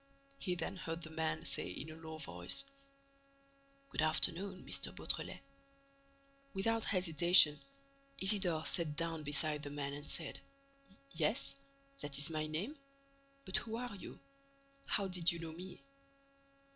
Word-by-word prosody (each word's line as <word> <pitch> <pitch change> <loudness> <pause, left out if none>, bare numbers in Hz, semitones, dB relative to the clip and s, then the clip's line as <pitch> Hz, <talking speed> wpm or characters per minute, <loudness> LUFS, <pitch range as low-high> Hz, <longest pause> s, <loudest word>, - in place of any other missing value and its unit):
He 180 -2 -1
then 190 +2 -4
heard 165 -1 -5
the 155 - -6
man 160 0 -2
say - - +2
in 145 +12 -6
a - - -9
low 160 -1 -8
voice: 90 - -1 1.2
"Good - - -1
afternoon, 175 +4 +3
M. - - -1
Beautrelet." - - +1 1.1
Without 225 +3 +1
hesitation, 170 -4 +6 0.6
Isidore 190 -5 +2
sat 160 -4 +1
down 165 0 -2
beside 150 0 +2
the 145 - -5
man 140 -1 -4
and 145 +1 -7
said: 160 -4 -2 0.7
"Yes, 240 +2 +1 0.4
that 145 -1 -2
is 145 +4 +3
my 155 -1 -2
name—but 275 - -6
who 225 -1 -3
are 245 -1 -4
you? 195 - -9 0.7
How 200 -2 +1
did 180 -2 +1
you 170 - -4
know 165 -1 -6
me?" 180 +7 -9
165 Hz, 130 wpm, -36 LUFS, 155-195 Hz, 1.2 s, hesitation